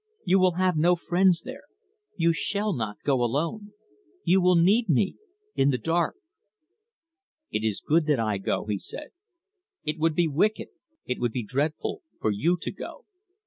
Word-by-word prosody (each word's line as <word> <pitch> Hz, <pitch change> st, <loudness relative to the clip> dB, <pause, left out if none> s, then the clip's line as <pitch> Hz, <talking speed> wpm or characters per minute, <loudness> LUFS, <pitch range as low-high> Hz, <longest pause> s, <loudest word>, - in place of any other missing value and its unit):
You 190 Hz, +1 st, +4 dB
will 185 Hz, -1 st, +4 dB
have 185 Hz, 0 st, +1 dB
no 175 Hz, +3 st, +4 dB
friends 175 Hz, 0 st, +2 dB
there. 260 Hz, +2 st, -9 dB, 0.5 s
You 170 Hz, -1 st, +3 dB
shall 205 Hz, +4 st, -1 dB
not 110 Hz, -7 st, -3 dB
go 135 Hz, -3 st, +2 dB
alone. 165 Hz, -, -2 dB, 0.5 s
You 185 Hz, +2 st, +4 dB
will 180 Hz, 0 st, +4 dB
need 195 Hz, +6 st, +4 dB
me 165 Hz, +6 st, +2 dB, 0.4 s
in 135 Hz, -, +3 dB
the 130 Hz, -, +1 dB
dark." 165 Hz, +7 st, 0 dB, 1.4 s
"It 105 Hz, -, -1 dB
is 110 Hz, -3 st, -2 dB
good 160 Hz, +1 st, +2 dB
that 145 Hz, -5 st, +2 dB
I 110 Hz, -3 st, 0 dB
go," 95 Hz, -, -2 dB
he 105 Hz, -2 st, -2 dB
said. 300 Hz, -, -8 dB, 0.7 s
"It 155 Hz, +1 st, -3 dB
would 160 Hz, 0 st, +2 dB
be 175 Hz, 0 st, +3 dB
wicked, 180 Hz, +9 st, 0 dB, 0.4 s
it 125 Hz, -, -3 dB
would 120 Hz, -2 st, -1 dB
be 125 Hz, -, -2 dB
dreadful, 145 Hz, +8 st, -2 dB, 0.2 s
for 110 Hz, -, +1 dB
you 165 Hz, -, +1 dB
to -, -, -3 dB
go." -, -, -9 dB
165 Hz, 170 wpm, -26 LUFS, 130-185 Hz, 1.4 s, You